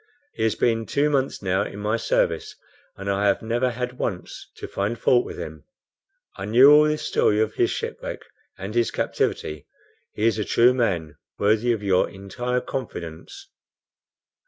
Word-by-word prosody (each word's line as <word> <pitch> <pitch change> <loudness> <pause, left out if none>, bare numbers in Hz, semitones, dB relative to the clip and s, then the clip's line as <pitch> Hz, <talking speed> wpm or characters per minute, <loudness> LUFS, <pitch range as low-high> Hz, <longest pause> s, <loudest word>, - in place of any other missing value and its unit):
He - - -7
has 110 -1 +2
been 115 -2 +1
two 145 +1 +1
months 135 -6 0
now 95 +1 +1
in 100 - -5
my 105 +2 0
service, 115 - 0 0.4
and 100 - -7
I 100 +1 +1
have 100 - +1
never 120 +3 +1
had 125 +1 -5
once 90 -2 -4
to - - -7
find 105 +4 -2
fault 120 0 +3
with - - -8
him. 75 -2 -7 0.7
I 95 - -5
knew 125 +7 +7
all 150 +1 +7
this 150 0 -1
story 105 - +2
of 110 0 +1
his - - +2
shipwreck - - -5 0.3
and 95 +3 -6
his 120 -1 +2
captivity. 75 -1 -2 0.5
He 105 - -1
is 115 -1 +2
a - - +1
true 120 +4 +4
man, 90 - -1 0.2
worthy 110 +4 +2
of 110 -3 -2
your 95 -2 +2
entire 120 +6 -3
confidence." 85 -11 -7
110 Hz, 170 wpm, -24 LUFS, 100-125 Hz, 0.7 s, knew